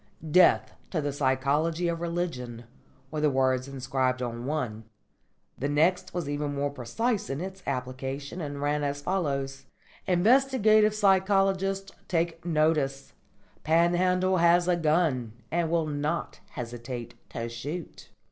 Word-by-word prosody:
"Death 180 +2 +5 0.2
to 170 - -1
the 145 -2 -2
Psychology 145 +5 +1
of 170 -1 -2
Religion" 165 -9 -3 0.5
were 155 -1 -2
the 150 - +4
words 130 -1 +1
inscribed 130 -1 -1
on 120 0 -4
one. 120 -8 -3 0.7
The 140 - -1
next 180 +5 +2
was 175 -4 -3
even 145 0 -2
more 140 0 -1
precise 205 - -2
in 135 - -2
its 190 +2 -6
application, 135 +4 -4
and 145 -2 -5
ran 145 0 0
as 145 0 -2
follows: 140 -7 -2 0.4
"_Inquisitive 215 +2 +4
psychologists 195 -1 +2 0.2
take 165 -1 -1
notice! 155 -4 0 0.5
Panhandle 180 +3 +3
has 170 +1 +4
a 180 - +4
gun, 155 -8 +1 0.2
And 170 0 +1
will 165 -1 +1
not 150 +2 -2
hesitate 120 -1 -6 0.2
to 115 - -4
shoot. 140 +9 -7
155 Hz, 130 wpm, -28 LUFS, 135-180 Hz, 0.7 s, Death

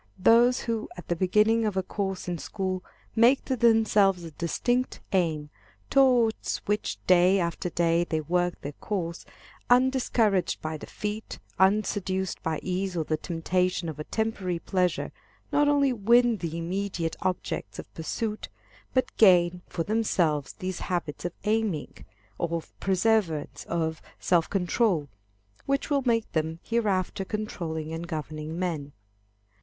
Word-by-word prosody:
Those 235 +5 +5
who 230 -2 -3
at 175 - -10
the 175 - +1
beginning 210 +6 +3
of 210 -3 -1
a 190 - +1
course 195 -1 -3
in 175 -2 -2
school 185 -1 -3 0.3
make 235 +4 +5
to 260 - 0
themselves 215 -6 +4
a 165 - -7
distinct 245 - -1
aim, 155 -5 0 0.4
towards 250 -5 +3
which 210 +1 -1
day 185 +2 +5
after 170 0 -2
day 170 0 +2
they 160 -2 -1
work 175 +3 0
their 145 - -5
course, 170 +1 -4 0.4
undiscouraged 240 -8 +3
by 155 0 -4
defeat, 210 +7 -5 0.2
unseduced 190 -1 +1
by 160 -1 -2
ease 185 0 -2
or 160 - +1
the 155 - 0
temptation 175 +2 -1
of 155 - -7
a - - -3
temporary 200 -3 -2
pleasure, 180 +1 -1 0.4
not 290 0 +3
only 280 -2 +3
win 235 +1 +4
the 165 -3 -4
immediate 175 -1 -2
objects 185 -1 -3
of - - -9
pursuit, 210 +6 -4 0.5
but 255 - +1
gain 180 -3 +5
for 165 - -3
themselves 175 -9 0
those 185 -1 -5
habits 175 -4 -3
of 175 - -2
aiming, 210 -7 0 0.5
of 170 -1 -2
perseverance, 190 -5 +1
of 160 -1 -2 0.2
self 170 -3 +2
control, 180 - +1 0.6
which 275 +2 0
will 280 -1 +3
make 230 -2 +1
them 160 0 -1
hereafter 200 -5 0
controlling 170 -7 -4
and 165 +1 -5
governing 155 0 -5
men. 160 -6 -3
185 Hz, 140 wpm, -27 LUFS, 165-220 Hz, 0.6 s, Those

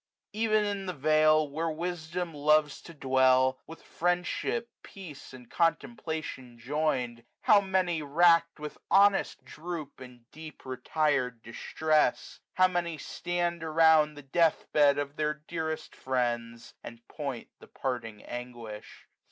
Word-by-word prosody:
Ev'n 215 -1 +2
in 200 -2 -3
the 180 - -2
vale, 155 +1 +4
where 160 +4 -2
wisdom 170 +1 -4
loves 150 0 +2
to - - -12
dwell. 130 -2 +2
With 165 - -12
friendship, 180 +7 -1
peace, 170 -8 -11
and 125 -2 -13
contemplation 160 - -2
join'd. 125 -3 -2 0.2
How 205 -1 +5
many, 185 -4 0
rack'd 165 +3 +3
with 150 -1 -8
honest 200 0 +3
passions, - - -13
droop 155 -3 -6
345 130 - -9
In 120 -1 -20
deep 155 -2 -12
retired 130 -2 -1
distress. 135 +2 0 0.2
How 185 0 +5
many 175 -3 -2
stand 175 +2 -3
Around 160 -1 +4
the 145 - -11
death 165 +4 +1
bed 145 -2 +5
of 145 0 -4
their 150 0 0
dearest 160 -2 -4
friends. 120 -2 -3
And 115 0 -11
point - - -6
the - - -15
parting 115 -5 -5
anguish. 120 -3 -9
155 Hz, 135 wpm, -29 LUFS, 130-170 Hz, 0.2 s, How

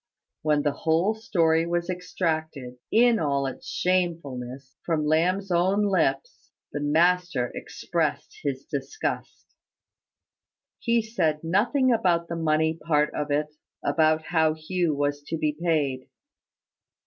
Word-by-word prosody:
When 150 -1 +2
the 145 - +2
whole 165 +8 +1
story 165 -7 +1
was 170 0 -1
extracted, 160 -8 -3
in 235 0 +5
all 140 -3 0
its 135 - -6
shamefulness, 140 -8 -2
from 160 -3 0
Lamb's 180 +5 +1
own 190 +4 +2
lips, 160 -9 0 0.2
the 145 - -3
master 160 -3 +2
expressed - - -3
his 135 -2 -3
disgust. 155 - -4 1.3
He 235 -1 +1
said 165 -9 -1
nothing 240 - +2
about 170 -6 +1
the 170 - -3
money 160 -1 +1
part 150 -2 +2
of 150 0 -3
it 150 +1 0 0.3
about 155 -1 +2
how 160 -2 +2
Hugh 165 0 -1
was 145 0 -1
to 165 - -2
be 155 -1 0
paid. 150 -6 -1
160 Hz, 125 wpm, -26 LUFS, 150-180 Hz, 1.3 s, in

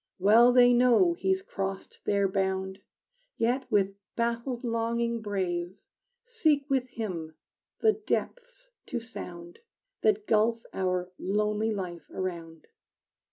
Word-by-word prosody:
Well 220 +6 +6
they 245 0 +6
know 250 +8 +5
he's 380 +2 0
crossed 195 - -5
their 200 -1 +2
bound, 190 0 -2 0.6
Yet, 245 +3 0
with 200 -2 +2 0.2
baffled 235 +2 -2
longing 235 0 -1
brave, 185 -3 -2 0.5
Seek 315 - +1
with 260 -2 +1
him 170 -10 -5 0.5
the 440 -1 +5
depths - - -4 0.2
to 245 - -2
sound 175 -7 -9 0.4
That 215 -1 +2
gulf 225 +2 +2
our 180 -1 -1
lonely 210 +2 0
life 180 -5 -5
around. 165 -4 -5
220 Hz, 115 wpm, -28 LUFS, 190-245 Hz, 0.6 s, Well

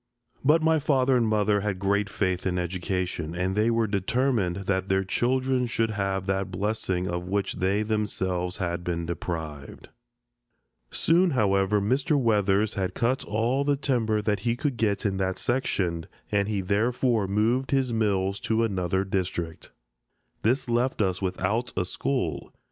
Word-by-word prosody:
But 155 +4 +4
my 160 0 +4
father 135 -3 +2
and 120 -2 +2
mother 105 -1 +2
had 100 -2 -2
great 100 +1 0
faith 95 -2 -1
in 90 -1 -1
education, 90 -2 -2
and 90 +2 -1
they 110 +2 +3
were 115 -1 +2
determined 105 -1 0
that 95 0 0
their 95 0 +2
children 130 +5 +1
should 115 -1 0
have 95 -2 -2
that 95 -1 -1
blessing 95 -2 -1
of 90 0 -3
which 100 0 -1
they 100 +3 +1
themselves 95 -4 -2
had 85 -2 -2
been 85 -1 -2
deprived. 80 -4 -6 1.0
Soon, 175 +3 +3
however, 105 - +2
Mr. 130 +8 +1
Weathers 105 -3 +2
had 95 -3 -2
cut 125 +3 0
all 115 +6 0
the 145 0 +2
timber 115 -6 0
that 105 -1 0
he 115 +4 0
could 135 -1 -2
get 105 -3 0
in 95 -2 0
that 95 -1 -1
section, 90 -10 -1 0.2
and 100 -1 +2
he 105 -2 -1
therefore 110 +2 +1
moved 115 +6 +1
his 135 -3 +1
mills 100 -3 0
to 115 0 +1
another 95 -3 0
district. 90 -4 -3 0.7
This 125 +4 +1
left 120 +2 0
us 95 -1 -1
without 100 +6 -1
a 90 - +1
school. 95 - -2
100 Hz, 155 wpm, -26 LUFS, 95-120 Hz, 1.0 s, But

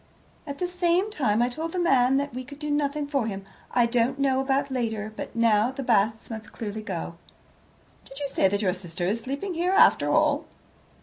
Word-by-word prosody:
"At 280 -1 -5
the 360 - -1
same 360 +3 +1
time 240 - +1
I 245 - +1
told 320 +6 -5
the - - -3
man 270 -6 +4
that 285 -1 -2
we 255 +1 -5
could 285 +2 -11
do 300 0 -4
nothing 290 0 0
for 275 -5 -1
him. 195 -2 -5 0.2
I 240 -1 +3
don't 240 +3 +1
know 270 -1 +2
about 270 +1 0
later, 220 -4 -2
but - - -7
now 230 -1 +3
the 265 +1 -5
Basts 220 -1 +1
must 220 -1 -7
clearly 215 -1 -5
go." 170 -4 -5 0.9
"Did 270 - -13
you 285 - -2
say 195 - +2
that 200 +2 -1
your 185 -2 +2
sister 175 -1 -5
is 215 +5 0
sleeping 280 - -4
here, 350 +3 0
after 390 - +5
all?" - - +2
255 Hz, 205 wpm, -26 LUFS, 220-285 Hz, 0.9 s, after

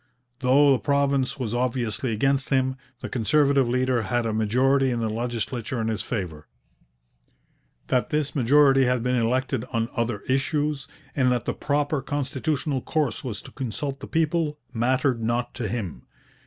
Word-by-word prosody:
Though 140 +2 +5
the 130 - +3
province 140 -2 +1
was 120 -5 -3
obviously 120 -1 -1
against 135 +5 +1
him, 130 -1 +2 0.3
the - - -4
Conservative 135 +1 +2
leader 125 -1 +1
had 120 +3 -1
a 110 - -1
majority 130 +5 +2
in 120 -2 -1
the 110 -2 -1
legislature 120 +1 -3
in 110 0 -1
his 110 -1 -2
favour. 85 -10 -5 1.4
That 125 - 0
this 150 -1 -1
majority 135 +1 +5
had 125 -1 +1
been 125 0 +1
elected 125 0 0
on 115 -1 0
other 115 -3 -1
issues, 145 +2 -1 0.3
and 130 -3 +3
that 120 -3 0
the - - -1
proper 145 0 0
constitutional 145 0 -2
course 150 -7 -1
was 110 -5 -5
to - - -12
consult 135 +2 -4
the - - -8
people, 160 -1 0 0.2
mattered 125 +1 +1
not 120 +2 -1
to 120 -4 -3
him. 110 -8 -5
130 Hz, 155 wpm, -25 LUFS, 115-140 Hz, 1.4 s, Though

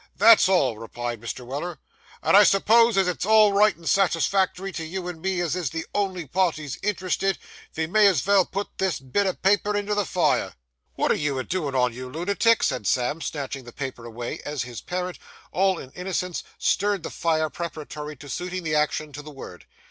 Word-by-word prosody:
'That's 225 -4 +7
all,' 130 - +2
replied 120 0 -5
Mr. 120 +1 -6
Weller. 150 +6 -5 0.5
'And - - +4
I 205 - +10
s'pose 225 +3 +4
as 190 -1 +3
it's 180 - -2
all 215 0 +5
right 210 +2 +4
and 165 -1 -11
satisfactory 195 +1 +1
to 165 - -5
you 180 +3 -5
and 170 -3 -7
me 190 0 -1
as 170 -2 -1
is 175 -6 -2
the 165 +3 -4
only 190 -4 -1
parties 155 -4 -1
interested, 195 -1 0 0.4
ve 160 - 0
may 210 +5 +5
as 185 -8 +3
vell 200 -1 +4
put 200 +1 -5
this 190 -3 0
bit 140 +10 0
o' 185 - +1
paper 205 +2 +1
into 205 0 -1
the 205 0 +1
fire.' - - +1 0.4
'Wot - - +2
are - - +5
you 145 -2 -1
a 130 - -1
doin' 155 -6 -3
on, 125 -2 +2
you 125 +1 -7
lunatic?' 200 - +2
said 125 -8 0
Sam, 130 - 0
snatching 140 -3 -4
the 120 - -11
paper 130 -3 -6
away, 120 +1 -6
as 145 -3 -3
his 120 -1 -8
parent, 180 0 -4
in - - -30 0.3
all 190 0 +2 0.2
innocence, 180 -1 -3 0.2
stirred 200 -3 +1
the - - -5
fire 160 -2 0
preparatory 150 -3 -6
to 145 - -13
suiting 180 +5 -4
the 155 -2 -2
action 150 0 0
to 145 - -7
the 150 - -11
word. 130 - -11
170 Hz, 200 wpm, -24 LUFS, 140-195 Hz, 0.5 s, I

